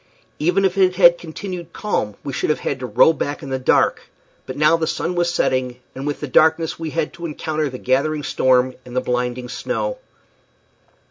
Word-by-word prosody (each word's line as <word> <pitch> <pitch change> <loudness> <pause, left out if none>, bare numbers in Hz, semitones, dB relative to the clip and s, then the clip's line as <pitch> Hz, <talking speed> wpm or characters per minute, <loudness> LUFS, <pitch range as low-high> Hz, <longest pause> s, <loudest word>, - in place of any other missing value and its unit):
Even 180 +5 +2
if 190 +1 0
it 185 -1 +4
had 175 -2 +6
continued 175 0 -7
calm 105 - -2
we 140 - -5
should - - -1
have 155 - 0
had 135 - -2
to 125 - -4
row 125 +8 +5
back 145 -1 -4
in 135 - -7
the 130 - -1
dark; 130 - +2 0.4
but 130 - -6
now 150 +2 +5
the 165 -1 -1
sun 180 - -2
was 175 -1 +1
setting, 130 -6 0
and 135 +2 -6
with 145 - -3
the 150 - -3
darkness 160 +5 +3
we 165 -1 -3
had 160 0 -2
to 170 0 -8
encounter 155 -1 -2
the 130 - -7
gathering 145 +4 0
storm 130 -1 +2
and 125 0 -11
the 130 - +2
blinding 125 0 -2
snow. - - -3
150 Hz, 200 wpm, -20 LUFS, 130-170 Hz, 0.4 s, had